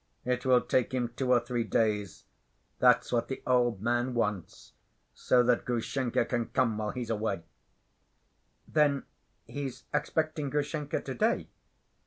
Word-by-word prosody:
It 125 +1 -1
will 125 -1 +5
take 130 0 0
him 120 -2 0
two 130 +1 0
or 125 - +6
three 120 0 -2
days. 105 -4 0 0.6
That's - - +4
what 120 -1 +1
the 130 - -6
old 120 -5 +2
man 120 +1 0
wants, 105 -6 -3 0.4
so 125 -1 +3
that 120 0 +2
Grushenka 120 0 -1
can 120 -2 -1
come 115 -4 +1
while 105 -1 -2
he's 120 0 -4
away." 105 -5 -2 1.2
"Then 145 -3 +2 0.4
he's 135 -3 -6
expecting 155 0 -1
Grushenka 150 +1 -2
to‐day?" 130 -3 0
125 Hz, 135 wpm, -30 LUFS, 115-130 Hz, 1.2 s, or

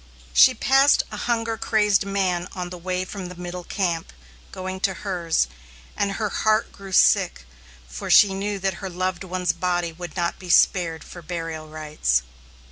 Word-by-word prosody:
She 60 0 +7
passed 270 +3 +4
a - - -5
hunger 230 -1 0
crazed 210 -3 +2
man 185 -3 0
on 180 -1 -5
the 180 - -6
way 185 +1 -2
from 190 -1 -7
the 180 - -9
middle 180 0 -6
camp, 175 -4 -2 0.4
going 185 0 -5
to 190 -1 0
hers, 170 - 0 0.5
and 200 -1 0
her 215 +1 -2
heart 215 +2 +1
grew 195 -1 -11
sick, 185 - +3 0.4
for 60 +1 -7
she 200 -2 +7
knew 200 +1 -2
that 195 0 -1
her 190 - -4
loved 185 0 -2
one's 185 -1 -1
body 175 0 -1
would 175 0 -9
not 170 -2 -1
be 180 - -10
spared 165 -2 +3
for 175 - -11
burial 165 -2 -5
rites. 150 - 0
180 Hz, 170 wpm, -23 LUFS, 170-195 Hz, 0.5 s, She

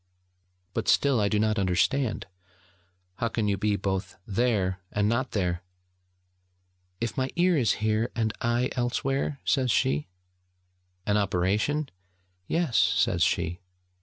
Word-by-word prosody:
'But - - -2
still 140 -4 +4
I 100 -1 +2
do 105 - +1
not 110 0 +1
understand: 100 +7 +1 0.9
how 115 - 0
can 110 -2 -1
you 100 - +2
be 105 +1 0
both 95 -1 -3
there 100 -4 0
and 105 0 +1
not 120 +4 0
there?' 90 -4 0 1.4
'If 115 0 -2
my 130 0 0
ear 175 0 +3
is 125 -8 +3
here, 110 +2 +1
and 110 -2 0
I 120 +2 +1
elsewhere?' 135 +3 -1
says 130 -3 +2
she. 75 - +1 1.0
'An 105 0 +2
operation?' 105 +10 0 0.6
'Yes!' 165 -8 +1
says - - +2
she. 85 +2 +1
110 Hz, 130 wpm, -27 LUFS, 100-125 Hz, 1.4 s, still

